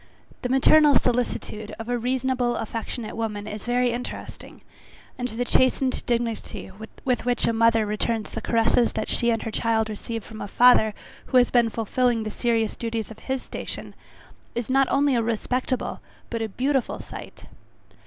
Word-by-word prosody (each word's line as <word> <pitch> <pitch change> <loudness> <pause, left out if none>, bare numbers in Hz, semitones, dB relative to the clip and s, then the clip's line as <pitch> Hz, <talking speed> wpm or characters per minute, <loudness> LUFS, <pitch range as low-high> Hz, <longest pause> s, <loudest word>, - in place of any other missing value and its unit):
The 250 - -2
maternal 285 +2 +6
solicitude 230 -3 -1
of 225 - -7
a 245 - 0
reasonable 250 0 0
affectionate 225 0 -4
woman 215 -2 -3
is 215 +1 -7
very 245 0 +2
interesting, 245 +1 -7 0.5
and 250 -1 -3
the 245 +1 -3
chastened 255 +1 +2
dignity 230 -4 -2 0.3
with 250 -2 +1
which 245 0 +1
a 230 - +2
mother 225 -1 +4
returns 210 +1 -1
the 225 - -4
caresses 230 +1 +2
that - - -3
she 235 - +2
and 225 -1 +1
her 225 - -4
child 220 0 +1
receive 225 +1 -5
from 220 - -10
a - - -4
father 220 -2 +5 0.3
who 260 - +3
has 245 -1 +5
been 240 -2 +4
fulfilling 230 +1 0
the 215 - -4
serious 230 -2 0
duties 230 -2 -3
of 220 - -11
his 265 -1 -3
station, - - -6 0.6
is 240 +1 -2
not 270 0 +4
only 280 0 +3
a 235 - +2
respectable, 250 +3 -1 0.3
but 230 -1 -2
a 220 - -2
beautiful 265 +5 0
sight. - - -10
235 Hz, 165 wpm, -25 LUFS, 225-250 Hz, 0.6 s, maternal